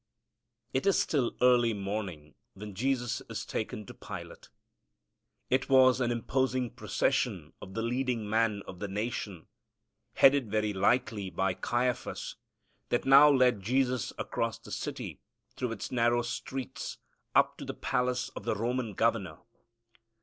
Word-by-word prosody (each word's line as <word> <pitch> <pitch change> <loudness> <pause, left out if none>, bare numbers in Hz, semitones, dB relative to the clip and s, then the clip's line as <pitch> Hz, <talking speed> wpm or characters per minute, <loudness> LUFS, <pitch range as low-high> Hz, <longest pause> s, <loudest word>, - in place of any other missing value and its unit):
It 130 +8 0
is 195 - +4
still 135 -6 0
early 120 -3 +5
morning 95 -7 -4 0.2
when 105 +1 -8
Jesus 125 +3 -1
is 115 - -4
taken 110 -1 -4
to - - -10
Pilate. - - -9 1.0
It 130 +2 +2
was 130 -1 +6
an 120 - +2
imposing 125 +1 0
procession - - -1
of 95 - -10
the 115 - -1
leading 120 -2 -1
men 110 -2 +1
of 90 - -9
the 105 - -3
nation, 100 -3 -4 0.7
headed 135 -4 +5
very 105 0 0
likely 100 0 +1
by 95 +1 0
Caiaphas, 120 +6 -2 0.5
that 120 - 0
now 140 +2 +8
led 125 -6 +4
Jesus 125 +3 +1
across - - -2
the - - -13
city, - - -5 0.4
through 125 -2 -2
its 105 - -6
narrow 120 -1 +2
streets, 130 +2 -5 0.4
up - - +4
to - - -6
the - - -5
palace 125 0 -1
of - - -9
the - - 0
Roman 115 0 -2
governor. 115 -3 0
120 Hz, 140 wpm, -30 LUFS, 105-130 Hz, 1.0 s, now